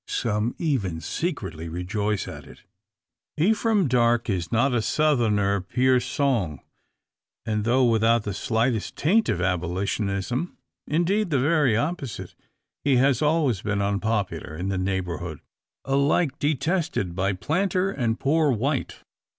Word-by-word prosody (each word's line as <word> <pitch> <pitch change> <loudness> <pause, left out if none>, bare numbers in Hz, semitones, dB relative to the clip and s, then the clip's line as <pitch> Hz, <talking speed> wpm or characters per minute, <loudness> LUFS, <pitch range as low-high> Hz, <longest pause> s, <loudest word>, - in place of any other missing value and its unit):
Some 110 +1 -1
even 110 - -1
secretly 85 - -4
rejoice 100 +4 -2
at - - -9
it. - - -15 0.7
Ephraim 210 +2 +2
Darke 120 -2 +2
is 90 -3 -3
not 125 +3 +2
a 120 - +2
Southerner, 110 -9 +2
pur 125 +7 +2
sang; 125 - -1 0.9
and, 105 -1 -1
though 125 +2 +3
without 115 0 +3
the 105 - -3
slightest 115 +3 -1
taint 215 +9 +2
of - - 0
abolitionism 100 - -2 0.3
indeed 180 +6 +1
the 145 - +2
very 140 -4 +3
opposite 145 - -3 0.5
he 140 -2 +3
has 130 -1 +3
always 150 - +2
been 105 -1 -1
unpopular 100 -5 -1
in 90 +3 -3
the 95 -1 -1
neighbourhood; 90 -4 -3 0.5
alike 140 +2 +1
detested 155 - -1
by 95 +1 0
planter 185 - 0
and 115 -8 -1
"poor 155 +2 +2
white." 135 +3 -1
120 Hz, 125 wpm, -25 LUFS, 100-145 Hz, 0.9 s, though